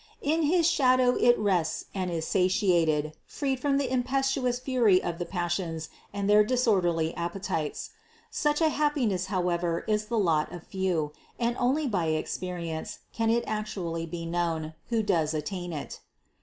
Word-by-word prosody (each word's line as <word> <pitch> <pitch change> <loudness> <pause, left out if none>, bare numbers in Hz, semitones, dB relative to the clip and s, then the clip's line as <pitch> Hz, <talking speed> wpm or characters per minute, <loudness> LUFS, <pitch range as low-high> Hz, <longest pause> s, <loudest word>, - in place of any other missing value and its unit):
In 315 +3 +2
his 330 +2 +3
shadow 255 -6 +4
it 240 0 +4
rests 180 -6 0
and 185 -2 -2
is 165 -2 -2
satiated, 170 -5 +2
freed 270 -3 -2
from 275 +1 +1
the 265 -2 -1
impetuous 260 0 +1
fury 245 -7 +3
of 170 -1 -4
the 175 - -3
passions 175 -3 -2 0.2
and 200 -1 -2
their 210 +1 +6
disorderly 190 -9 +1
appetites. 170 -2 -3 0.4
Such 295 +1 +1
a 320 - +5
happiness 270 - 0
however 175 -3 -1
is 215 0 +1
the 230 +2 -2
lot 165 -7 +2
of 175 -2 -9
few, 180 -6 -1 0.2
and 235 0 0
only 270 +5 +2
by 180 - 0
ex 155 - -2
perience 170 -3 -5 0.2
can 225 -1 0
it 235 +1 +2
actually 185 -6 -3
be 170 +1 -5
known, 165 -2 -2 0.2
who 230 -2 +1
does 165 -6 +1
attain 175 +3 -4
it. 150 -3 -6
613. - - -36
190 Hz, 160 wpm, -28 LUFS, 170-245 Hz, 0.4 s, their